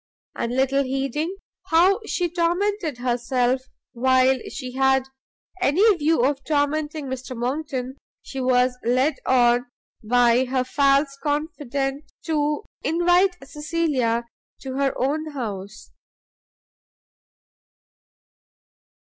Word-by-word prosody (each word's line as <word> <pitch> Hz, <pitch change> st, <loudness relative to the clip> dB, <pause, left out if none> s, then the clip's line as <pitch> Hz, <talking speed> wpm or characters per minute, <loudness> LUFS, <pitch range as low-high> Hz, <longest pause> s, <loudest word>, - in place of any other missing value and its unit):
And 235 Hz, +1 st, -2 dB
little 270 Hz, +1 st, +2 dB
heeding 275 Hz, +6 st, -2 dB, 0.3 s
how 360 Hz, +6 st, +4 dB
she 355 Hz, -, 0 dB
tormented 345 Hz, -, -1 dB
herself 245 Hz, +1 st, 0 dB, 0.3 s
while 260 Hz, +1 st, +3 dB
she 255 Hz, -3 st, -6 dB
had 265 Hz, 0 st, +2 dB, 0.6 s
any 380 Hz, +7 st, +4 dB
view 310 Hz, -5 st, +2 dB
of 275 Hz, 0 st, -1 dB
tormenting 295 Hz, +1 st, -1 dB
Mr 260 Hz, -1 st, -6 dB
Monckton, 260 Hz, +1 st, -3 dB, 0.3 s
she 270 Hz, -, -6 dB
was 250 Hz, 0 st, +2 dB
led 255 Hz, +5 st, +2 dB
on 245 Hz, -1 st, +3 dB, 0.4 s
by 245 Hz, +2 st, +3 dB
her 255 Hz, 0 st, 0 dB
false 275 Hz, +1 st, +2 dB
confident 290 Hz, -2 st, -3 dB
to 300 Hz, +1 st, 0 dB, 0.2 s
invite 355 Hz, +3 st, +2 dB
Cecilia 295 Hz, -7 st, -1 dB, 0.4 s
to 265 Hz, -1 st, -6 dB
her 275 Hz, 0 st, 0 dB
own 305 Hz, +4 st, -1 dB
house. 210 Hz, -5 st, -6 dB
270 Hz, 95 wpm, -23 LUFS, 255-310 Hz, 0.6 s, how